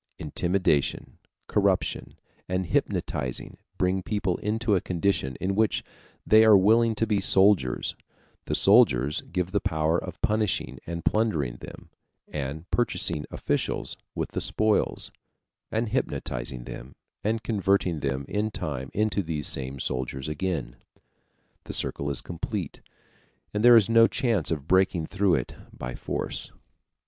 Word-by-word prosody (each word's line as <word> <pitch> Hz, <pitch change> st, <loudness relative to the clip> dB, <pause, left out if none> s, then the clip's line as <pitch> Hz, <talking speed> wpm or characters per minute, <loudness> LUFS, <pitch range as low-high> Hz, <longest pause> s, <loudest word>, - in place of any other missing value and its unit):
Intimidation, 85 Hz, -1 st, 0 dB, 0.3 s
corruption, -, -, 0 dB, 0.3 s
and 95 Hz, 0 st, 0 dB
hypnotizing 65 Hz, -5 st, -2 dB, 0.2 s
bring 95 Hz, +1 st, +1 dB
people 100 Hz, -2 st, -1 dB
into 110 Hz, +1 st, 0 dB
a 90 Hz, -, +1 dB
condition 85 Hz, -7 st, -1 dB
in 95 Hz, +6 st, -2 dB
which 110 Hz, +1 st, +1 dB, 0.4 s
they 110 Hz, +1 st, +6 dB
are 110 Hz, -2 st, +8 dB
willing 110 Hz, +4 st, +4 dB
to 115 Hz, -, +1 dB
be 105 Hz, -2 st, +1 dB
soldiers; 95 Hz, -10 st, +3 dB, 0.5 s
the -, -, -1 dB
soldiers 75 Hz, -, +4 dB
give 90 Hz, 0 st, -1 dB
the 100 Hz, -, +1 dB
power 80 Hz, -3 st, +1 dB
of 90 Hz, -1 st, -8 dB
punishing 105 Hz, -, 0 dB
and 85 Hz, -1 st, -5 dB
plundering 80 Hz, -, +1 dB
them -, -, -12 dB, 0.4 s
(and 75 Hz, +3 st, -5 dB
purchasing 85 Hz, -10 st, 0 dB
officials -, -, -2 dB, 0.2 s
with -, -, -3 dB
the -, -, -3 dB
spoils), 110 Hz, -1 st, +1 dB, 0.6 s
and 110 Hz, 0 st, -1 dB
hypnotizing -, -, -3 dB
them 60 Hz, +2 st, -9 dB, 0.3 s
and 110 Hz, +1 st, -1 dB
converting 100 Hz, -6 st, +1 dB
them 70 Hz, -1 st, -2 dB
in 105 Hz, +1 st, -1 dB
time 70 Hz, -9 st, -4 dB
into 105 Hz, -1 st, +1 dB
these 80 Hz, -5 st, -3 dB
same 65 Hz, 0 st, -1 dB
soldiers 65 Hz, +2 st, -3 dB
again. 75 Hz, -6 st, -3 dB, 0.9 s
The -, -, -6 dB
circle 70 Hz, -, 0 dB
is 70 Hz, -3 st, +1 dB
complete, 85 Hz, -2 st, -5 dB, 0.7 s
and 105 Hz, +1 st, -1 dB
there 120 Hz, 0 st, +9 dB
is 105 Hz, -, +5 dB
no 115 Hz, 0 st, +6 dB
chance 115 Hz, -, 0 dB
of 75 Hz, -3 st, -3 dB
breaking 95 Hz, -2 st, +2 dB
through 100 Hz, 0 st, +2 dB
it -, -, -3 dB, 0.2 s
by -, -, -6 dB
force. -, -, -4 dB
90 Hz, 135 wpm, -26 LUFS, 70-105 Hz, 0.9 s, there